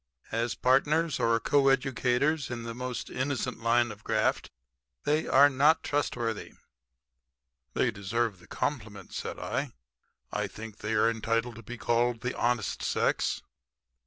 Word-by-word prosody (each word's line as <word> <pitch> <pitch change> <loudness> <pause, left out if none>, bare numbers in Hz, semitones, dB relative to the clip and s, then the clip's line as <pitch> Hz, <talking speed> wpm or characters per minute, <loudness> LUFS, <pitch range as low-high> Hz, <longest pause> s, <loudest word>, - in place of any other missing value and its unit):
As 115 +1 -1
partners 150 +5 +2
or 115 0 +3
coeducators 135 +2 +2
in 120 -1 -4
the 115 0 -5
most 125 +1 -5
innocent 130 -2 -2
line 120 0 +3
of 105 0 -12
graft - - 0 0.5
they 150 +2 +1
are 140 +2 +7
not 145 +3 +3
trustworthy." 120 -6 -2 1.2
"They - - +2
deserve 100 0 -1
the 90 - -18
compliment," 105 -9 -4
said - - -4
I. - - -3 0.6
"I - - -1
think 110 -1 -9
they 110 +1 -2
are 105 - +4
entitled 115 +1 -1
to - - -9
be 120 +3 -8
called 120 0 +1
the 125 - -2
honest 120 -2 0
sex." - - 0
120 Hz, 135 wpm, -29 LUFS, 115-135 Hz, 1.2 s, are